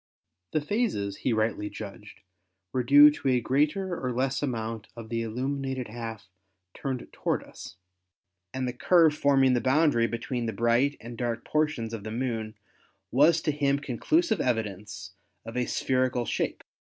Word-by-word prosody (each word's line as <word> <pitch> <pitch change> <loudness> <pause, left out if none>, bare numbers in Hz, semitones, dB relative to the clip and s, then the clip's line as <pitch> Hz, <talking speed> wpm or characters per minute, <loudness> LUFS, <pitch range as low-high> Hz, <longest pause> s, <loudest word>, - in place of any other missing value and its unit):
The 155 - +1
phases, 145 - -1
he 130 - -1
rightly 110 -2 0
judged, 105 0 -10 0.5
were 130 - +1
due 145 +4 +8
to 145 - -5
a 130 -2 +4
greater 150 - 0
or 125 - 0
less 130 +2 -1
amount 115 -5 -3
of 115 -2 -9
the 115 0 -1
illuminated 130 +2 -3
half 115 -3 -7 0.5
turned 130 -3 -4
toward - - -1
us, - - -11 0.8
and 130 +2 -2
the 125 - -3
curve 165 +4 +4
forming 135 -3 +3
the 120 - +2
boundary 130 -2 +3
between 115 +1 -3
the 110 - -2
bright 120 +5 +2
and 120 +1 -9
dark 120 -2 -2
portions 150 -7 0
of 110 -3 -5
the 110 - -5
Moon 115 -2 -3 0.6
was 155 +6 +5
to - - +1
him 140 -1 +1
conclusive 205 - +1
evidence 105 -6 -3 0.3
of 115 - -8
a 125 -1 0
spherical 130 -2 0
shape. - - -2
125 Hz, 155 wpm, -27 LUFS, 115-140 Hz, 0.8 s, due